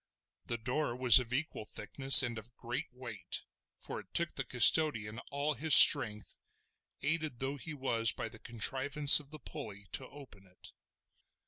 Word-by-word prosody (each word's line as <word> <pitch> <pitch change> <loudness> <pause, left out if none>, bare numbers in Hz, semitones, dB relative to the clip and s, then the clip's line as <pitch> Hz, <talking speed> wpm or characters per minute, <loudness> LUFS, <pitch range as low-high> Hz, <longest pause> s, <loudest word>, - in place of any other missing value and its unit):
The 120 - -6
door 125 +2 -6
was 125 -1 +4
of 120 -2 -10
equal 140 -2 -7
thickness 135 +7 +5
and 120 -3 -7
of 120 +3 -18
great 125 +6 -9
weight, 125 -1 -10 0.3
for - - -11
it - - -20
took - - -4
the - - -7
custodian 115 -9 0
all 140 +2 -5
his 155 0 +3
strength, 105 -7 +4 0.6
aided 155 -3 -5
though 135 +3 -8
he 155 +3 -12
was 115 -5 -3
by - - -9
the 110 - -16
contrivance 135 +7 +2
of 145 -2 -19
the 155 - -13
pulley, 105 -10 -13
to 130 - -8
open 125 -9 -18
it. 90 - -18
130 Hz, 160 wpm, -29 LUFS, 115-145 Hz, 0.6 s, thickness